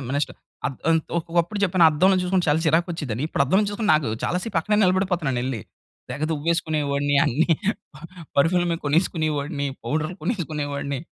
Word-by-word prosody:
ఆమె 130 0 -5
నెక్స్ట్ 145 - -1 0.3
అద్ 135 - -4
అంత్ 160 -1 +2
ఒ - - +4
ఒకప్పుడు 175 +4 +1
చెప్పాను. 180 -2 +3
అద్దంలో 185 +5 +3
జూసుకుంటే 180 -1 0
చాలా 155 +2 +2
చిరాకొచ్చేదని. 160 -6 0
ఇప్పుడు 140 - +1
అద్దం 190 +9 +3
చూసుకుంటే 210 +1 -1
నాకు 150 -7 +1 0.2
చాలా 180 - 0
సేపు 205 -7 -1
అక్కనే 210 +5 0
నిలబడిపోతున్నాను 180 -8 +1
ఎళ్లి. 130 -5 -3 0.5
తెగ 150 - -3
దువ్వేసుకునేవాడిని 145 -3 0
అన్ని. 145 +7 +1 0.9
పెర్ఫ్యూమ్‌ల 175 +5 +3
మీద 165 - -1
కొనేసుకునే 160 +1 +1
వాడిని, 140 0 -3 0.2
పౌడర్‌లు 155 +4 -2
కొనేసుకునే 160 -7 -2
వాడిని. 140 -1 -3
160 Hz, 160 wpm, -23 LUFS, 145-180 Hz, 0.9 s, ఒ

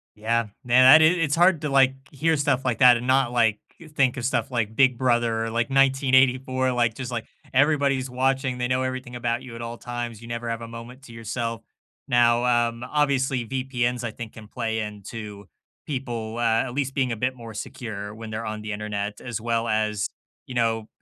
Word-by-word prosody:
Yeah, 115 +1 0 0.2
man, 125 +1 +5
that 155 +5 +9
is 165 +3 +5
it's 150 -3 +1
hard 175 -2 +4
to, 150 - -2
like, 135 -1 +4 0.2
hear 155 +3 +1
stuff 140 -2 +1
like 125 -1 -1
that 125 -2 +7
and 125 - -6
not, 130 -2 +3
like, 115 -3 +2 0.4
think 130 -4 +3
of 120 - -3
stuff 135 +1 -1
like 110 -3 -1
Big 130 -2 +4
Brother 120 -3 +1
or, 115 - -3
like, 115 +1 -1
1984. 130 -1 +3
Like, 120 -2 +1
just, 125 0 -6
like, 115 -2 -3 0.3
everybody's 140 -2 +2
watching, 130 0 0
they 125 0 -1
know 125 +1 0
everything 130 -1 -4
about 120 -1 -1
you 120 -3 -10
at 115 - -7
all 115 0 -6
times, 120 -2 -6
you 115 - -11
never 115 0 -4
have 115 0 -3
a 115 - -7
moment 120 +3 -10
to 120 - -13
yourself. 115 0 -4 0.5
Now, 120 0 +3 0.2
um, 115 +1 -7
obviously, 135 -4 0
VPNs, 125 -2 -2
I 115 - -3
think, 115 -1 -8
can 110 -1 -12
play 110 -1 -3
into, 105 -1 -7 0.4
people, 120 -5 -4
uh, 115 -1 +2
at 125 -2 -6
least 135 -1 -2
being 130 -3 0
a - - -1
bit 130 +3 -1
more 115 -2 -10
secure 110 -4 -6
when 110 0 -8
they're 110 +1 -4
on 110 0 -4
the 110 - -5
Internet 105 0 -4
as 120 -3 -5
well 115 0 -1
as, 110 -1 0 0.4
you 130 - -8
know, 115 -2 0
120 Hz, 205 wpm, -24 LUFS, 115-130 Hz, 0.5 s, that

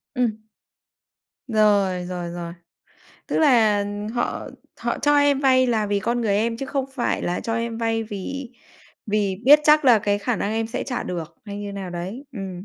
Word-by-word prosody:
Ừm, 250 -2 +2 1.2
rồi, 205 -5 +2
rồi, 175 -1 -4
rồi. 170 -1 -6 0.7
Tức - - -1
là, 230 -9 +4
ờm, 205 +1 -4
họ 240 +2 -3 0.3
họ - - -2
cho 290 0 +3
em 285 -1 +3
vay 255 -2 +4
là 220 -3 +1
vì 205 0 0
con 235 +4 -1
người 210 -3 +1
em 230 +2 0
chứ 270 - -5
không 275 -1 -1
phải 245 - -1
là 175 - -1
cho 225 - -3
em 230 0 -3
vay 225 -1 0
vì 225 +5 -6 0.6
vì 205 -2 0
biết 290 +4 +9
chắc 300 -1 +5
là 240 -4 +7
cái 205 0 0
khả 235 +3 -1
năng 205 - -2
em 225 0 -1
sẽ 225 - -4
trả 250 -3 -3
được 170 -2 -6
hay 205 -1 -7
như 205 -1 -5
nào 195 -2 -6
đấy, 185 +10 -6
ừm. 190 -4 -6
220 Hz, 195 wpm, -23 LUFS, 200-245 Hz, 1.2 s, biết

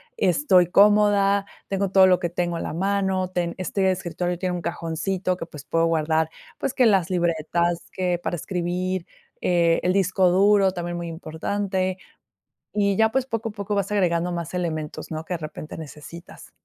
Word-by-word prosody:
estoy 185 - +3
cómoda, 200 0 +4 0.2
tengo 195 -1 -1
todo 190 -1 +7
lo 180 -1 +4
que 175 -2 -2
tengo 175 0 -2
a - - -3
la - - -4
mano, 190 0 0
ten 175 -1 -1
este 190 +1 0
escritorio 175 -1 -3
tiene 180 -1 -1
un 175 - -4
cajoncito 180 +3 -2
que, 165 - -6
pues, 150 -4 -11
puedo 165 0 +1
guardar, 160 0 +1 0.3
pues, 265 - -2
que 250 - +3
las 195 -6 +3
libretas, 170 0 0
que 180 -2 -1
para 175 - -2
escribir, 180 +1 -2 0.4
eh, 170 -2 +3
el 180 - +2
disco 185 -1 +3
duro 195 +1 +4
también 175 -1 -4
muy 170 0 -4
importante, 185 +3 -2 0.8
y 200 -1 +2
ya 220 0 +4
pues, 265 -1 +1
poco 225 -2 -3
a - - -11
poco 205 0 -4
vas 200 0 -1
agregando 175 -3 +1
más 170 0 -4
elementos, 160 -4 -4
¿no?, 160 0 -4
que 180 - -6
de - - -3
repente 155 0 -8
necesitas. 160 +3 -11
180 Hz, 175 wpm, -24 LUFS, 170-195 Hz, 0.8 s, todo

